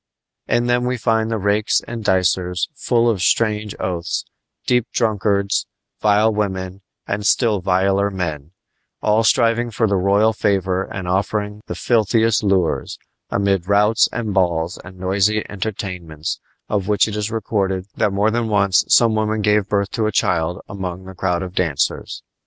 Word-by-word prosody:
In 120 - +1
them 120 0 +1
we 125 0 -1
find 110 -1 +1
the 115 - -1
rakes 105 +1 +1
and 115 -2 -6
dicers, 90 -1 +1
full 120 -5 +1
of 110 -6 +1
strange 105 0 +1
oaths, 90 -2 -2 0.4
deep 125 -1 +2
drunkards, 100 -3 0 0.3
vile 105 +1 +3
women 95 -2 -3 0.3
and 100 +1 -2
still 105 -1 +2
viler 95 +2 +2
men, 80 -7 -4 0.5
all 110 +1 +3
striving 115 +1 +2
for 115 0 0
the 100 -2 +1
royal 100 +4 +3
favor 95 -2 0
and 95 -2 -6
offering 105 +3 -1
the - - -4
filthiest 115 -1 +2
lures, 95 -9 0 0.3
amid 100 -3 0
routs 105 +2 +3
and 110 -3 -3
balls 85 -2 0
and 90 +1 -12
noisy 100 +3 +1
entertainments, 90 -6 -5 0.3
of 100 -3 -1
which 105 0 +3
it 105 - -4
is 105 0 -2
recorded 100 -4 -1
that 105 - +1
more 100 +3 +1
than 115 0 -1
once 100 -3 +3
some 115 -2 +5
woman 110 0 0
gave 105 -1 +2
birth 100 -1 0
to 110 -2 0
a - - -1
child 85 -3 0
among 95 -2 -6
the 95 - -9
crowd 90 -1 -1
of 90 -1 -7
dancers. 80 -7 -1
100 Hz, 160 wpm, -20 LUFS, 95-110 Hz, 0.5 s, some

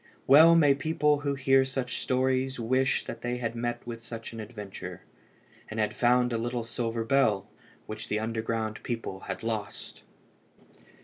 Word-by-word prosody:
Well 160 +5 +8
may 145 -4 +6
people 150 0 +1
who 140 -1 -1
hear 135 0 +4
such 130 -2 -3
stories 130 0 0
wish 130 +3 +1
that 115 - -7
they 120 0 -2
had 115 -2 -3
met 120 0 -3
with 115 -1 -7
such 115 0 -7
an 115 - -7
adventure, 105 -3 -8 0.7
and 110 - -5
had 105 0 +1
found 125 0 +3
a 115 - 0
little 120 +1 -2
silver 115 0 -3
bell 115 -5 +2 0.4
which 110 +1 -7
the 105 - 0
underground 110 0 -2
people 115 -5 -4
had - - -4
lost! 110 -3 -5
120 Hz, 160 wpm, -28 LUFS, 115-130 Hz, 0.7 s, Well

